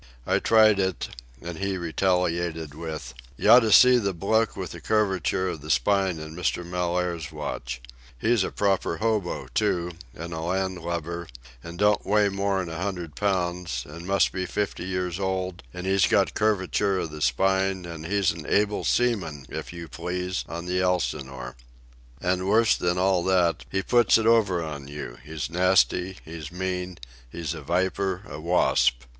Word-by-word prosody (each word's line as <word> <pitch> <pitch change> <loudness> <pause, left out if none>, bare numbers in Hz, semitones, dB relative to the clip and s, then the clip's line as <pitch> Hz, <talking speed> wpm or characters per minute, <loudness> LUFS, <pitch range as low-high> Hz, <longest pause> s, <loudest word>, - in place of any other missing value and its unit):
I - - +2
tried 110 -2 +5
it, 95 -2 -1 0.3
and 85 -1 -6
he 100 -1 -1
retaliated 85 -3 0
with: 80 -5 -6 0.2
"You - - +4
oughta 115 -3 +7
see 125 +3 +8
the 100 -4 -1
bloke 110 +6 +1
with 90 -3 -5
curvature 95 -3 +1
of 80 - -5
the 75 - -9
spine 95 -1 +2
in 80 0 -8
Mr. 90 0 -1
Mellaire's 90 -2 -2
watch. 60 0 -5 0.4
He's 110 - +2
a - - -2
proper 95 -4 0
hobo, 105 -5 -1
too, 85 0 0 0.2
and 85 +1 -6
a 80 - -4
land 95 +2 -1
lubber, 85 0 -4 0.4
and 85 +1 -8
don't 105 +2 +3
weigh 105 0 +3
more'n 100 -2 -1
a 80 +1 -5
hundred 90 -6 -4
pounds, 90 -9 -1
and 85 +4 -9
must 100 0 +3
be 90 -1 -3
fifty 100 -1 -2
years 90 -1 -2
old, 95 -2 -2
and 90 0 -7
he's 95 0 +3
got - - +2
curvature 100 -1 +1
of 85 -4 -3
the 75 0 -8
spine, 95 +7 +1
and 85 -2 -7
he's 100 -1 +2
able 105 +4 +1
seaman, 95 - 0
if - - -6
you 85 -1 -8
please, 90 +3 -3
on 85 +1 -5
the 90 +1 0
Elsinore. 70 -9 -2 0.6
And 90 +1 0
worse 110 +1 +4
than 90 0 0
all 95 -1 +2
that, 90 -3 +2
he 95 0 -1
puts 120 +3 +4
it 110 - -1
over 105 -7 +3
on 75 -3 -6
you; 70 -4 -7
he's 75 -3 -4
nasty, 90 +1 +2
he's 80 0 -8
mean, 90 0 -3 0.3
he's 85 -3 -4
a 80 - -7
viper, 95 +4 -1
a - - -7
wasp. 80 -7 +2
90 Hz, 165 wpm, -26 LUFS, 85-95 Hz, 0.6 s, see